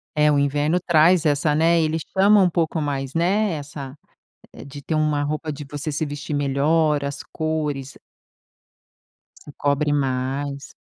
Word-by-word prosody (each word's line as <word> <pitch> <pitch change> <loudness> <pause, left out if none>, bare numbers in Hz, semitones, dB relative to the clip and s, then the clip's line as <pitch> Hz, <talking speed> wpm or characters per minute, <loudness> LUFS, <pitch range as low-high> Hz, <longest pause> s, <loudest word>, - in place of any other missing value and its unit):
É, 150 0 +4
o 145 - +2
inverno 145 +4 +1
traz 170 0 +3
essa, 150 0 +2
né, 165 +1 +3
ele 160 +1 0 0.2
chama 205 +2 +5
um 185 -2 +4
pouco 165 -1 -1
mais, 140 -1 -3
né, 195 +4 +1
essa 145 -2 -7 0.7
de 140 +1 -10
ter 155 +3 -3
uma 150 -1 +1
roupa 155 +2 -3
de 145 +1 -8
você 145 +2 -4
se 155 +2 -2
vestir 145 +1 -6
melhor, 145 +2 +1
as 140 0 -5
cores 150 -4 -3
e - - -17 1.4
Se 145 - -12
cobre 145 +1 0
mais. 140 +1 -2
150 Hz, 155 wpm, -22 LUFS, 140-160 Hz, 1.4 s, chama